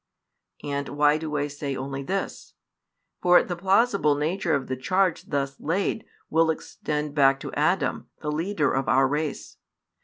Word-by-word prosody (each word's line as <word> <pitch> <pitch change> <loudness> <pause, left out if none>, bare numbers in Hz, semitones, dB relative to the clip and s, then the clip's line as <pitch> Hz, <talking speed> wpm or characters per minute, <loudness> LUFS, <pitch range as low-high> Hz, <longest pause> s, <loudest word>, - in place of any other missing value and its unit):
And 140 -1 -3
why 145 +1 +3
do 155 -1 -4
I 145 0 +1
say 140 -1 -4
only 135 +1 -4
this? 190 +8 -4 0.7
For 180 0 +6
the 175 - -4
plausible 195 -3 +3
nature 160 +3 0
of 135 -2 -2
the 130 - -3
charge 185 +7 0
thus 140 -1 -2
laid 195 +6 -1 0.2
will 165 +1 +3
extend 150 -2 -3
back 135 -2 +4
to - - -6
Adam, - - 0
the 150 - -3
leader 160 -1 0
of 135 0 0
our 135 +1 +4
race. 150 +2 -3
150 Hz, 155 wpm, -25 LUFS, 140-175 Hz, 0.7 s, For